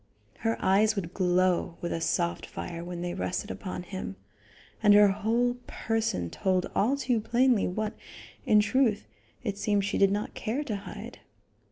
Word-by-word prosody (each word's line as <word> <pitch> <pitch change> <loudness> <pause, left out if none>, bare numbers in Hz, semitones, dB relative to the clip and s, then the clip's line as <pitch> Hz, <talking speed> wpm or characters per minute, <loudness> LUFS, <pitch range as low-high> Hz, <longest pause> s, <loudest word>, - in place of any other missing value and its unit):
Her 225 0 0
eyes 210 +3 +4
would 180 -3 -4
glow 180 -2 +1
with 175 - -3
a 165 - -3
soft 85 - 0
fire 125 - -6
when 175 0 -5
they 175 0 -2
rested 185 +3 -3
upon 185 -2 -5
him, 185 - -6 0.7
and 205 -2 +6
her 205 -1 +7
whole 230 +5 +1
person 220 - -1
told 185 -2 +1
all 255 +7 +2
too 250 -4 +1
plainly 235 0 +3
what, 210 +3 -2 0.5
in 210 -1 +5
truth, 220 -1 +1 0.4
it 205 -4 -3
seemed 205 -2 +1
she 205 - -1
did 195 - +6
not 205 +1 -2
care 250 +7 -2
to 220 -7 -3
hide. 200 - -8
205 Hz, 165 wpm, -28 LUFS, 180-225 Hz, 0.7 s, her